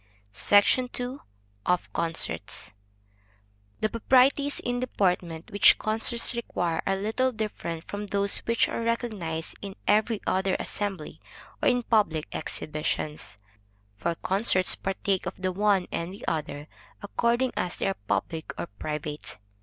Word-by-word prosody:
SECTION 205 - +4
II. 250 +2 -3 0.5
Of 180 0 0
Concerts. 165 -9 -2 1.1
The 215 - +2
proprieties 265 +5 +4
in 245 0 -1
deportment 180 -8 0
which 205 - +7
concerts 225 +3 0
require, 175 -8 -1
are 195 - +3
little 220 +6 +1
different 210 -7 -4
from 205 0 -4
those 200 0 0
which 230 0 +2
are - - -3
recognized 215 -9 -2
in 195 -1 -6
every 215 +1 +3
other 190 0 +1
assembly 195 -7 -4 0.4
or - - +5
in 245 -1 +2
public 200 -10 +2
exhibitions; 150 -5 -3 0.6
for 170 +11 -1
concerts 190 0 +3
partake 195 0 -1
of - - -3
the 185 0 0
one 195 -1 +2
and 170 +2 -2
the 195 - -9
other, 150 -2 -2 0.4
according 240 +4 +1
as 175 - -1
they - - -2
are 195 - 0
public 160 -1 -1
or 85 - -1
private. 150 -1 -4
200 Hz, 130 wpm, -27 LUFS, 170-230 Hz, 1.1 s, which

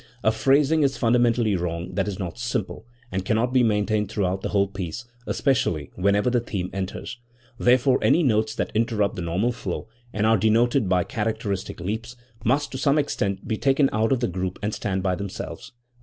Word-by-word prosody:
A 110 - +4
phrasing 140 +7 +3
is 140 -2 +2
fundamentally 120 -3 +3
wrong 85 +1 -3
that 90 - 0
is 100 -3 -3
not 90 +2 -5
simple, 120 -2 -3 0.2
and 95 0 -2
cannot 115 +5 +1
be 130 - +5
maintained 105 -2 +1
throughout 95 -2 -1
the - - -3
whole 100 -1 +2
piece, 95 +3 -6 0.2
especially 85 - 0
whenever 100 +5 +2
the 120 - +3
theme 95 -6 -4
enters. 95 +6 -5 0.4
Therefore 125 +1 +4
any 175 - +4
notes 110 -3 +1
that - - -2
interrupt 110 -2 +1
the - - -4
normal 90 +8 0
flow 120 - -5 0.2
and 105 +1 0
are 110 0 +5
denoted 115 +2 +2
by 90 -1 +3
characteristic 110 -4 -3
leaps, 110 +7 -4 0.3
must 140 +5 +1
to 130 - -5
some 140 +1 +3
extent 100 -9 -1
be 110 - -1
taken 135 +2 +3
out 110 +1 +1
of 130 -2 +2
the 120 - +2
group 90 0 -3
and 105 +1 -1
stand 95 -2 -2
by 95 -1 +1
themselves. 100 +1 -6
110 Hz, 185 wpm, -24 LUFS, 95-120 Hz, 0.4 s, be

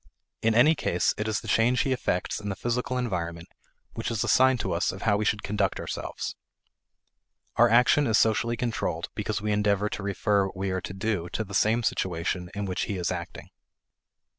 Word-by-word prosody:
In 110 0 +2
any 150 +7 +6
case, 90 - 0
it 105 - -3
is 110 -1 -1
the - - -10
change 120 +2 +3
he 135 - 0
effects 105 -8 -1
in 105 -1 -5
the 95 - -2
physical 125 +4 -2
environment 85 -8 -3 0.4
which - - -3
is 115 -3 -1
a - - -3
sign 130 0 +5
to - - -3
us 85 +2 +1
of 95 - -8
how 105 -3 +3
we 105 +1 -1
should 105 0 0
conduct 100 -1 -1
ourselves. - - -5 1.2
Our 120 +1 +5
action 125 +5 +4
is 110 -2 +3
socially 115 +1 +2
controlled 120 -2 -2
because - - -3
we 105 - 0
endeavor 105 0 +1
to - - -5
refer 100 0 +1
what 95 - -10
we 95 0 -2
are 95 0 -2
to 90 0 -6
do 95 -3 -2
to 110 - -1
the 100 -1 -11
same 110 +5 +2
situation 90 -2 -1
in 100 0 -2
which 95 -2 -2
he 100 - -3
is 90 -1 -1
acting. 85 -2 -6
105 Hz, 205 wpm, -27 LUFS, 95-115 Hz, 1.2 s, any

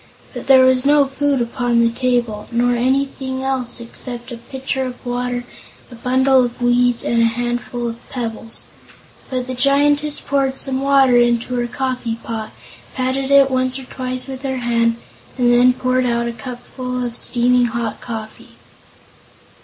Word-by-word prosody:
But - - -7
there 260 -1 +7
was 260 -1 +4
no 290 0 +5
food 275 0 0
upon 240 0 0
the 230 0 +3
table, 240 -4 -1
nor 240 +1 +2
anything 260 +1 -1
else 260 -3 -1
except 240 +1 -8
a 240 - -6
pitcher 265 +2 -4
of 255 0 -7
water, 245 0 -2 0.5
a - - -9
bundle 260 +2 +3
of 240 0 -4
weeds 245 0 +2
and 235 0 +1
a - - +5
handful 240 +1 -2
of 230 0 -8
pebbles. 230 -3 -5 0.7
But 255 -1 -2
the 255 - -5
Giantess 290 +3 +3
poured 270 -1 0
some 265 -1 -1
water 275 -3 +4
into 240 0 +2
her 240 -1 -1
coffee 250 -2 -3
pot, 225 -1 -6 0.4
patted 265 +1 -1
it 275 -1 +5
once 255 0 +1
or 265 - -8
twice 255 0 -5
with 265 -1 -7
her 265 -1 -2
hand, 235 -1 +1 0.4
and 245 -1 +3
then 245 +1 +6
poured 255 0 0
out 235 0 0
a 235 - -3
cupful 250 0 -6
of 240 - -4
steaming 245 +1 +2
hot 230 -2 -3
coffee. 220 -2 -8
250 Hz, 160 wpm, -19 LUFS, 240-265 Hz, 0.7 s, there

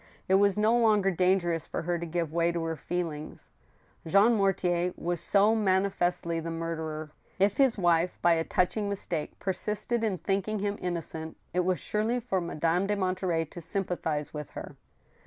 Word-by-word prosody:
It 190 - +2
was 200 +1 +4
no 215 +2 +4
longer 215 -5 +4
dangerous 180 -2 +1
for - - -4
her 175 +1 -1
to 170 - -4
give 165 -1 -2
way 170 0 +2
to 170 -1 -2
her 165 0 -2
feelings. 160 -1 -5 0.6
Jean 200 +7 +5
Mortier 180 -4 +1
was 175 0 -2
so 205 +4 +4
manifestly 185 -5 +1
the 165 +1 -5
murderer. 160 -2 -4 0.3
If 200 +1 +2
his 265 -5 +4
wife, 175 -1 +2
by 175 - +4
a 165 0 +1
touching 200 +5 0
mistake, 175 -6 -4
persisted 210 +4 -2
in 210 -4 0
thinking 195 +5 -1
him 205 0 -2
innocent, 165 -2 -4 0.2
it 180 - +1
was 180 0 +1
surely 220 +4 0
for 225 -6 -1
Madame 170 +2 0
de 205 - +1
Monterey 185 -3 0
to 170 +3 -10
sympathize 160 -5 -2
with 150 -2 -6
her. - - -7
180 Hz, 170 wpm, -29 LUFS, 165-200 Hz, 0.6 s, Jean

